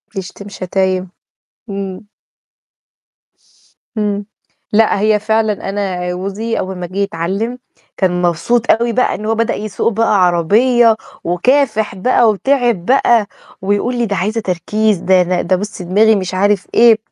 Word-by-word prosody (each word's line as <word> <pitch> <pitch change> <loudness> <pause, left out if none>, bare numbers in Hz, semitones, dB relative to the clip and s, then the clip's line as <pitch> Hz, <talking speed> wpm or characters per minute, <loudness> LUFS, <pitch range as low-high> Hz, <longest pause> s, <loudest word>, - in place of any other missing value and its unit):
بيشتم 195 +1 -7
شتايم، 185 -1 -2 0.6
امم. 195 0 -5 1.9
امم 205 -1 -1 0.5
لأ، 215 -1 +3
هي 215 +1 +2
فعلًا 215 -1 -1
أنا 190 -3 -3
جوزي 200 +5 -3
أول 190 0 -4
ما 180 -1 -5
جِه 185 +3 -9
يتعلم، 200 +5 -2 0.4
كان 180 -2 0
مبسوط 180 +8 +1
أوي 235 +1 +1
بقى 255 - +1
إن 215 - -7
هو 225 +1 0
بدأ 230 0 0
يسوق 215 +2 -2
بقى 210 -3 +2
عربية، 225 +7 +3 0.3
وكافح 220 +3 +1
بقى 230 +4 +3
وتعب 240 -3 0
بقى 235 -4 +3 0.3
ويقول 205 +6 0
لي: 240 - 0
"دي 200 -2 -2
عايزة 215 +4 -1
تركيز" 210 +3 0
ده 185 +1 +3
ده 180 0 -1
"ده 185 +2 +1
بُصي 205 0 -5
دماغي" 210 +5 +3
مش 185 -2 -3
عارف 200 +1 +1
إيه 230 -1 +6
205 Hz, 140 wpm, -16 LUFS, 185-225 Hz, 1.9 s, إيه